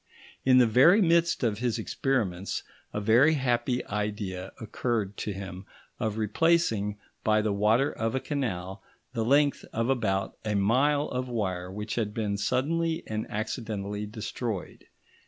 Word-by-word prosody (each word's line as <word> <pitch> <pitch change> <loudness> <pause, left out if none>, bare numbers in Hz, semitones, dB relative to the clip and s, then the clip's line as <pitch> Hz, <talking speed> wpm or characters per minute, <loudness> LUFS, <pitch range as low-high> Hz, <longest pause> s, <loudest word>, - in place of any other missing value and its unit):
In 130 -1 +5
the 125 - +7
very 135 - +6
midst 170 -5 +3
of 110 -3 +1
his 120 -1 0
experiments 105 -6 -1 0.3
a - - -2
very 120 +9 +5
happy 125 -2 0
idea 105 -3 -3
occurred 110 -2 -2
to 105 - -3
him 95 -1 -7 0.3
of 110 -1 -1
replacing 110 -3 +1 0.3
by 110 0 +3
the 105 -1 +1
water 110 +8 +3
of 115 +2 -2
a - - +1
canal, 95 - -3 0.3
the 115 -2 0
length 140 +4 +3
of 115 +2 -1
about 95 -7 0
a 105 -1 -1
mile 135 +9 +3
of 125 0 -3
wire 95 -6 -2
which 105 +2 -5
had 105 -1 -4
been 105 -3 -1
suddenly 160 +10 0
and 110 0 -3
accidentally 105 -2 -3
destroyed. 110 -1 -5
110 Hz, 145 wpm, -28 LUFS, 105-130 Hz, 0.3 s, the